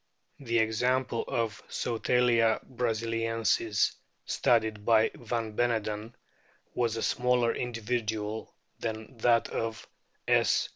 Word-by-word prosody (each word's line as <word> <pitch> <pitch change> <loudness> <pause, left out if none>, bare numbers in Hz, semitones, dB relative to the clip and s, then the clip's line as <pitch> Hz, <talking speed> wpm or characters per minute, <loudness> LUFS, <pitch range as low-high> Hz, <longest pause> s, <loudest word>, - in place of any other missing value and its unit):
The 115 -4 -1
example 120 +2 +1
of 115 -3 -2
Sotalia 120 -1 +2
brasiliensis 115 -2 0 0.3
studied 110 -3 +1
by 110 0 +4
van 115 -2 -4
Beneden 110 -1 -1 0.6
was 115 -2 0
a - - -2
smaller 125 -2 +2
individual 110 -2 -3 0.2
than 110 +2 -5
that 115 0 +3
of 115 0 -3 0.4
S. - - +3
115 Hz, 95 wpm, -29 LUFS, 110-120 Hz, 0.6 s, by